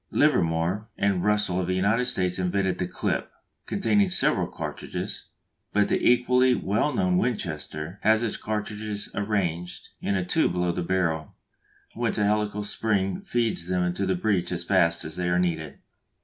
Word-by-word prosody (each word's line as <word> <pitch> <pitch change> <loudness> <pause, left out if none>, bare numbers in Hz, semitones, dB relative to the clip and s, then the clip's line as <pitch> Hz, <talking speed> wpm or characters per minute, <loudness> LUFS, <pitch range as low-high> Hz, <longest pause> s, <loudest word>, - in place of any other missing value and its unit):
Livermore 85 +6 +1
and 100 -3 +1
Russell 105 -3 +2
of 90 - -3
the 90 - 0
United 105 +6 +2
States 95 -7 0
invented 95 +1 0
the 90 - -1
"clip," - - -2 0.4
containing 200 0 +2
several 185 - +3
cartridges; - - -5 0.5
but 105 -1 +3
the - - 0
equally 125 +1 +3
well 110 +9 0
known 185 +1 +1
Winchester 85 - -3
has 110 +2 +3
its 115 - -1
cartridges 105 -1 -3
arranged 90 -4 -2
in 100 - 0
a 95 -2 -1
tube 160 - +2
below 90 -1 0
the 90 - -3
barrel, 85 -4 -1 0.6
whence 120 -1 -1
a 105 - +2
helical 105 0 0
spring 100 - 0
feeds 115 - -1
them 90 -1 0
to 100 +2 -2
the 95 - +1
breech 95 -1 0
as - - -2
fast 85 0 +2
as 80 +1 -5
they 90 -1 -1
are 90 - +2
needed. 80 -5 -1
100 Hz, 165 wpm, -26 LUFS, 90-110 Hz, 0.6 s, several